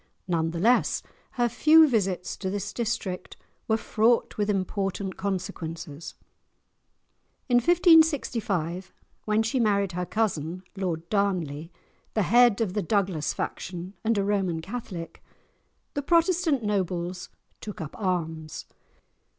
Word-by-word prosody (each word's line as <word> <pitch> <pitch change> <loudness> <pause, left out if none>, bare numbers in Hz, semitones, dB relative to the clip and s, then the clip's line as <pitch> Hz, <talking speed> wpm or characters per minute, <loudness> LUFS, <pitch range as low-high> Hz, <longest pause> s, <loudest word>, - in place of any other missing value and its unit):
None 165 -2 +1
the 165 - -5
less 240 +7 +3 0.3
her 240 -1 +2
few 310 +7 +6
visits 195 -8 -1
to 190 - -3
this 200 0 -4
district 215 -6 -3 0.3
were 220 - +2
fraught 225 +1 +1
with 210 0 -1
important 195 -1 -2
consequences. 170 -5 -5 1.3
In 245 - +4
1565, 245 - +3 0.3
when 215 +1 +2
she 225 +4 0
married 200 -4 +2
her 180 0 -3
cousin 180 -5 -1
Lord 170 -4 -3
Darnley, 175 -6 -1 0.4
the 215 - +3
head 235 +3 +5
of 200 -5 0
the 210 - 0
Douglas 190 -5 0
faction 180 +1 -5
and 225 -1 +1
a 200 - +2
Roman 195 -5 0
Catholic, 185 -3 -7 0.7
the 285 - -1
Protestant 335 -3 +2
nobles 180 -3 -2 0.3
took 210 - -8
up 155 -4 -6
arms. 165 -5 -3
195 Hz, 120 wpm, -26 LUFS, 175-225 Hz, 1.3 s, few